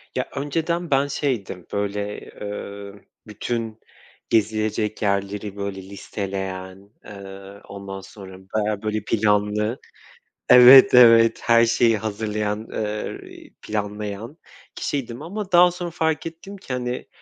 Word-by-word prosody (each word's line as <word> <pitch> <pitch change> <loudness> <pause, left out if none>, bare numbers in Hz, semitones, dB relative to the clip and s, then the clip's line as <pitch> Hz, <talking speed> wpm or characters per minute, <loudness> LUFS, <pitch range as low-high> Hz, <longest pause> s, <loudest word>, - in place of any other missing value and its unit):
Ya, - - -2
önceden 165 +4 -2
ben 135 +1 +3
şeydim, 120 - -3
böyle, 105 0 -3
ııı, 100 0 -7 0.3
bütün 110 +1 -4 0.5
gezilecek 110 -1 0
yerleri, 100 0 -2
böyle, 100 -1 -5
listeleyen, 95 -1 -6 0.2
ııı, 100 0 -11
ondan 100 -1 -8
sonra 95 -2 -12
bayağı, 105 +2 -2
böyle, 110 -1 -2
planlı 105 +1 +1 0.7
Evet, 125 +2 +9
evet, 115 -2 +7
her 115 0 +5
şeyi 115 -1 +3
hazırlayan, 105 0 -3
ııı, 105 0 -4
iii, - - -15
planlayan 105 +5 -5 0.4
kişiydim 125 -3 -4
ama 195 +4 -6
daha 175 0 +6
sonra 175 0 -5
fark 160 -2 -1
ettim 165 +5 -8
ki, 160 -9 -7
hani, 125 0 -4
105 Hz, 115 wpm, -22 LUFS, 100-125 Hz, 0.7 s, Evet